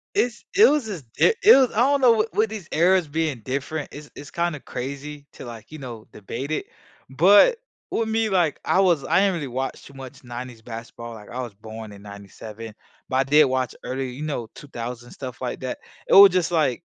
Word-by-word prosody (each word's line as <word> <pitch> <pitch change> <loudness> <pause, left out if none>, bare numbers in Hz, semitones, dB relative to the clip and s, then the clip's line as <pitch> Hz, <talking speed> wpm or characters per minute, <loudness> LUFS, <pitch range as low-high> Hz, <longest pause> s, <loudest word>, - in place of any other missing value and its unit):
It's 245 - 0
it 420 +3 +8
was 295 -4 +1
just 180 - -6
di - - +4
it 430 - +9
was 265 -2 +4
I - - -8
don't 280 +2 +3
know, 250 -2 +7
w - - -6
with 220 +1 +2
these 210 -6 -7
eras 175 +1 +3
being 150 -4 -2
different, 140 +3 -3
it's 145 0 -11
it's 145 - -10
kinda 170 -3 -1
crazy 140 +3 -7
to, - - -10
like, 115 0 -10
you 155 - -8
know, 120 -6 -9
debate 120 +7 -6
it. 155 - -2 0.4
But 200 - +6 0.3
with 225 - 0
me, 220 0 +1
like 175 -6 +1
I - - +2
was 175 -7 +3
I - - +3
didn't 195 -1 +2
really 150 -5 -4
watch 130 +1 -4
too 140 - -14
much 135 0 -11
'90s 120 -1 -8
basketball, 115 0 -8
like, 105 -2 -12
I 125 +1 -5
was 120 -4 -7
born 110 +1 -10
in 100 -1 -13
'97, 105 +2 -10 0.3
but 130 - -3
I 135 - +3
did 150 +3 +5
watch 130 -2 -1
early, 130 0 -4
you 135 +5 -7
know, 140 -7 -3
2000s 120 -3 -8
stuff 130 -2 -8
like 125 - -4
that. 130 -1 -4 0.3
It - - +1
was 195 -1 +10
just 175 -1 0
like 150 -7 +1
140 Hz, 215 wpm, -23 LUFS, 120-175 Hz, 0.4 s, was